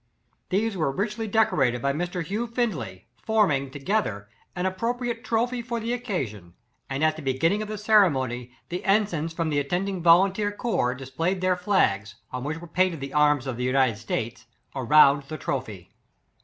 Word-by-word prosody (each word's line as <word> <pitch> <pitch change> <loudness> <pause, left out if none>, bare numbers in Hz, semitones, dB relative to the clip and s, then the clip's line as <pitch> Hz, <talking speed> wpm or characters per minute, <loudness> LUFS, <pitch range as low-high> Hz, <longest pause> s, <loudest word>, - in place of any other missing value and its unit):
These 210 +3 0
were 155 -6 0
richly 210 +7 -2
decorated 185 - +2
by 140 +3 0
Mr. 175 +3 -3
Hugh 210 +8 -3
Findley, 160 - -3 0.2
forming, 175 -12 +2
together, 135 - -2 0.3
an 180 0 -2
ap 185 0 -2
propriate 240 0 -2
TROPHY 240 +2 0
for 235 0 -3
the 230 +2 -2
occasion; 125 - -4 0.3
and, 135 +2 -2
at 155 0 +2
the - - -7
beginning 160 +9 +1
of 215 - -4
the 215 0 -5
ceremony, 135 - +2 0.2
the 180 +1 -4
en 210 +2 +4
signs 165 -4 -4
from 165 -1 -2
the 145 - +2
attending 180 +6 -2
volunteer 190 +5 +4
corps 205 - -1
displayed 150 +8 -2
their 185 0 +2
flags, 115 - +1 0.2
on 125 0 -4
which 150 +3 -3
were 170 - -9
paint 180 +1 +1
ed - - -9
the 135 0 -6
arms 150 -2 +3
of 130 -3 -4
the 125 - -3
United 130 -3 +2
States 115 +1 -4 0.3
around 140 +2 +5
the 155 - -5
trophy. 105 - -5
165 Hz, 180 wpm, -25 LUFS, 135-205 Hz, 0.3 s, around